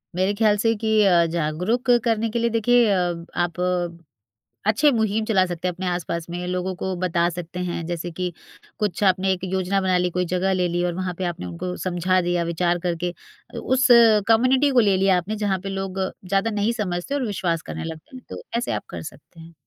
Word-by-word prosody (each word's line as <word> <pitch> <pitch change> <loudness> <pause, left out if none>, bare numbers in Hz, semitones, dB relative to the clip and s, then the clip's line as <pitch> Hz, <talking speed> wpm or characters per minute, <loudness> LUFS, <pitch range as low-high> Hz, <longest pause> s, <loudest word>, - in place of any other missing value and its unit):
मेरे 190 +3 +1
ख्याल 210 -1 +3
से 225 +2 +2
कि 220 0 +2
अ, 175 -3 +5
जागरूक 170 +9 -1 0.2
करने 225 -1 +1
के 235 - -2
लिए 235 0 +1
देखिए 235 +1 +3
अ, 175 -3 -1
आप 175 0 -1 1.1
अच्छे 285 +8 +4
मुहिम 220 -2 0
चला 195 -4 +3
सकते 175 0 -4
हैं। 180 - -1
अपने 185 +1 -6
आस-पास 170 -1 -3
में 175 +1 -4
लोगों 180 +1 -2
को 185 +1 -3
बता 170 -1 +2
सकते 175 +1 -7
हैं 170 -1 -4
जैसे 175 0 -4
कि 180 +1 -3 0.5
कुछ 205 -1 -1
आपने 190 0 +3
एक 185 - -7
योजना 190 +1 0
बना 185 -1 +2
ली 180 0 +1
कोई 180 - +1
जगह 190 +1 +1
ले 180 -1 +1
ली 175 +1 -1
और 175 - -1
वहाँ 185 0 -3
पे 190 - -3
आपने 170 - -4
उनको 90 - -5
समझा 185 +1 +1
दिया 175 0 0
विचार 175 +1 0
करके 175 0 -2 0.4
अ, - - -5
उस 260 0 +2 0.4
कम्युनिटी 255 +5 +4
को 250 - +4
ले 200 -4 +3
लिया 190 -1 +3
आपने 195 +5 -3
जहाँ 200 -3 -1
पे 195 - -4
लोग 195 0 -4 0.3
ज़्यादा 195 +4 +1
नहीं 210 +2 0
समझते 200 +3 -3
और 275 -3 -1
विश्वास 175 -5 -1
करने - - -6
लगते 160 +7 -8
हैं। 255 - -10
तो - - -7 0.2
ऐसे 240 - -2
आप - - -3
कर 85 - -6
सकते 140 - -12
हैं। 165 +1 -13
185 Hz, 215 wpm, -23 LUFS, 175-210 Hz, 1.1 s, अ